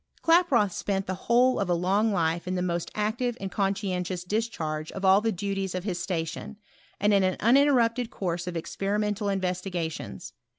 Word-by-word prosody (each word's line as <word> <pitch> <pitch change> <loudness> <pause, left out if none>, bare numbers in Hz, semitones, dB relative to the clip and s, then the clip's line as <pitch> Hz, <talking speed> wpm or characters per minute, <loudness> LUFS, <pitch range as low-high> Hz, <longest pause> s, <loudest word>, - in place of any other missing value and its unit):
Klaproth 330 - +4
spent 195 +1 -2
tl^ 185 - -3
whole 245 +6 +3
of - - -1
a 175 - +3
long 195 +6 +2
life 170 -2 0
in 185 - -1
the 180 - -1
most 170 -1 -2
active 230 +3 -1
and 195 -1 -5
conscientious 185 -3 -1
discharge 180 -7 -2
of 195 0 -4
all 190 +2 +6
the 225 +1 +1
duties 195 -1 -3
of 185 - -3
his 180 -4 -3
station, 175 +3 -4 0.4
and 205 +1 +3
in 200 - +5
an 185 -1 +1
uninterrupted 245 -1 +3
course 175 -7 -3
•f 180 - -4
experimental 205 +4 -1
investigations. 180 -3 -3
195 Hz, 170 wpm, -27 LUFS, 180-215 Hz, 0.4 s, all